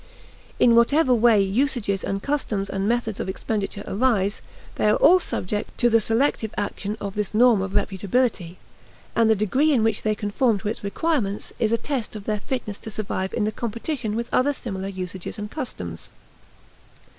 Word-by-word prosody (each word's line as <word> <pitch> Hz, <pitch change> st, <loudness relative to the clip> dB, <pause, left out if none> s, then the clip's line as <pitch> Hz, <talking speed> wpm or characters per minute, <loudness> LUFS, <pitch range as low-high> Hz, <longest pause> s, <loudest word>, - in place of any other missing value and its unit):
In 235 Hz, -, +6 dB
whatever 255 Hz, +4 st, +4 dB
way 230 Hz, -2 st, +5 dB
usages 200 Hz, -1 st, 0 dB
and 195 Hz, 0 st, -3 dB
customs 220 Hz, -9 st, -1 dB
and 195 Hz, +2 st, -1 dB
methods 235 Hz, -3 st, -1 dB
of -, -, -3 dB
expenditure 205 Hz, 0 st, -3 dB
arise, 205 Hz, -3 st, +1 dB, 0.3 s
they 210 Hz, -, +1 dB
are 210 Hz, -, +4 dB
all 370 Hz, +2 st, +6 dB
subject 210 Hz, -, -4 dB
to 240 Hz, -1 st, +3 dB
the 230 Hz, 0 st, +5 dB
selective 225 Hz, -1 st, 0 dB
action 205 Hz, +1 st, -3 dB
of 200 Hz, -1 st, -4 dB
this 210 Hz, 0 st, -3 dB
norm 235 Hz, -3 st, +5 dB
of 195 Hz, 0 st, -4 dB
reputability; 195 Hz, -2 st, 0 dB, 0.6 s
and 230 Hz, -1 st, +4 dB
the 220 Hz, -, +5 dB
degree 255 Hz, +10 st, +2 dB
in 245 Hz, -6 st, +3 dB
which 220 Hz, -1 st, +1 dB
they 215 Hz, -1 st, 0 dB
conform 210 Hz, +2 st, +1 dB
to 200 Hz, +2 st, -3 dB
its 220 Hz, -, -5 dB
requirements 205 Hz, -2 st, -1 dB
is 225 Hz, -2 st, +1 dB
a 230 Hz, -, +3 dB
test 255 Hz, -4 st, -3 dB
of 210 Hz, -, -6 dB
their 210 Hz, 0 st, -1 dB
fitness 215 Hz, -3 st, -4 dB
to -, -, -8 dB
survive 195 Hz, -2 st, -3 dB
in -, -, 0 dB
the 215 Hz, -, 0 dB
competition 230 Hz, +1 st, -3 dB
with 235 Hz, +1 st, -2 dB
other 285 Hz, +3 st, +3 dB
similar 195 Hz, -7 st, -5 dB
usages 185 Hz, 0 st, -6 dB
and 210 Hz, 0 st, -6 dB
customs. 90 Hz, -, -6 dB
215 Hz, 180 wpm, -24 LUFS, 200-240 Hz, 0.6 s, In